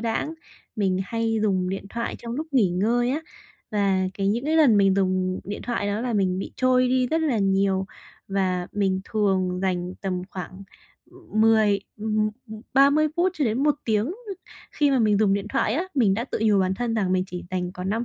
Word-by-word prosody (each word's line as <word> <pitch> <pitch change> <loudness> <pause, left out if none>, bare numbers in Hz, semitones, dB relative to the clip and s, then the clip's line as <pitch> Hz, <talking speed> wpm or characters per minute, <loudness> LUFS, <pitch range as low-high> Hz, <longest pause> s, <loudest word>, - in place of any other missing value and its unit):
đãng, 235 +7 -2 0.4
mình 190 -3 +1
hay 225 +1 -1
dùng 190 -4 +1
điện 195 +1 -4
thoại 235 +3 -4
trong 235 -1 -7
lúc 305 +5 -3
nghỉ 225 -9 +3
ngơi 235 +7 +1
á. 290 +4 -1 0.5
Và 195 -3 +1
cái 195 -1 -1
những 235 +6 0
cái 315 +1 +1
lần 275 -10 +6
mình 195 -1 +4
dùng 185 -1 0
điện 205 - -6
thoại 230 -4 -2
đó 205 +1 -1
là 245 0 -2
mình 190 -3 +1
bị 195 - -5
trôi 255 0 +3
đi 255 0 +2
rất 320 +6 0
là 275 -8 +1
nhiều, 195 -1 +1 0.4
và 185 -2 0
mình 190 -2 0
thường 190 -4 0
dành 180 -1 -1
tầm 185 -2 -2
khoảng, 185 +1 -7 0.5
ưm, 355 -12 -4
mười 220 -2 +4 0.2
ừm, 215 0 0 0.2
ừm, 220 -1 -8
30 285 +3 +5
phút 355 +2 +2
cho 305 -5 0
đến 230 +4 0
1 295 0 +3
tiếng 220 +6 0 0.6
khi 290 -2 +2
mà 270 - +3
mình 210 -3 +3
dùng 205 -2 +3
điện 200 0 -3
thoại 215 - 0
á. 320 - 0
Mình 220 -8 +3
đã 230 +4 -2
tự - - -4
nhủ 210 -2 +4
bản 185 0 +1
thân 235 +2 -2
rằng 195 -4 0
mình 185 0 +1
chỉ 180 -2 -7
dành 180 -1 -2
còn 180 0 -5
5 225 +3 -1
210 Hz, 215 wpm, -24 LUFS, 190-240 Hz, 0.6 s, lần